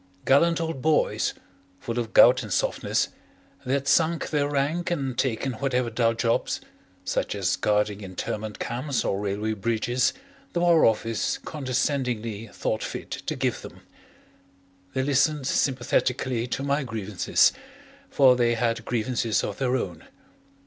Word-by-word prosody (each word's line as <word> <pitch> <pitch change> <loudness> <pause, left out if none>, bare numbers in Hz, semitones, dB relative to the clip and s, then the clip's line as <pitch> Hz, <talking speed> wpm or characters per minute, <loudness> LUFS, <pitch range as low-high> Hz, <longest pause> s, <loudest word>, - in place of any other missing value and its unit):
Gallant 165 +5 +4
old 165 -5 -3
boys, 155 +1 +1 0.4
full 115 +4 -3
of 115 -2 -3
gout 125 +3 +7
and 105 -4 -8
softness, - - 0 0.6
they 130 - +1
had 140 -1 -2
sunk 165 +3 +2
their 145 -2 +1
rank 145 +5 0
and 135 -7 -2
taken 130 +1 -1
whatever 125 -1 -1
dull 115 0 +1
jobs, 115 0 0 0.5
such - - -1
as - - +1
guarding 105 -1 0
internment 105 +3 -5
camps 130 +3 -2
or 95 - 0
railway 105 +2 -2
bridges, 115 +4 0 0.4
the 175 - 0
War 170 -2 +5
Office 110 -1 0
condescendingly 125 -6 -2
thought 110 - -2
fit - - -6
to - - -4
give - - -1
them. - - -11 1.1
They 130 - +1
listened 140 +1 +2
sympathetically 125 -2 0
to 135 - -3
my 140 +1 +1
grievances, 105 -6 +1 0.6
for 130 -2 +5
they 120 -1 +2
had 115 0 -1
grievances 115 -2 0
of 105 - -4
their 130 -1 +1
own. 90 -10 -4
125 Hz, 140 wpm, -25 LUFS, 110-140 Hz, 1.1 s, gout